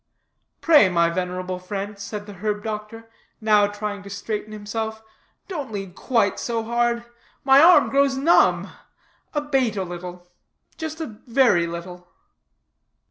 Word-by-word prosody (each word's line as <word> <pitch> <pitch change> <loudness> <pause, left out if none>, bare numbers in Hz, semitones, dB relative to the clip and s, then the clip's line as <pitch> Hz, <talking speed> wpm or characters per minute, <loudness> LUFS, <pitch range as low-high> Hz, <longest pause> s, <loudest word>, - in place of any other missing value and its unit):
"Pray, 295 - +6
my 170 -1 +2
venerable 180 +1 -3
friend," 200 +2 -6
said 205 +1 -6
the 205 - -10
herb 210 +2 -3
doctor, 220 +1 -6 0.3
now 210 -2 +4
trying 205 0 -5
to 200 - -11
straighten 210 +2 -5
himself, 220 +1 -5 0.4
"don't 295 - -5
lean 195 -3 -6
quite 215 -1 0
so 230 -2 -2
hard; 235 +1 0 0.4
my 270 +1 +7
arm 350 +2 +7
grows 275 -1 +2
numb; 300 +6 +4 0.7
abate 270 -7 0
a 190 - 0
little, 175 0 -8 0.5
just 320 0 -6
a - - -2 0.2
very 230 -9 +3
little." 175 +1 -8
210 Hz, 135 wpm, -23 LUFS, 190-240 Hz, 0.7 s, my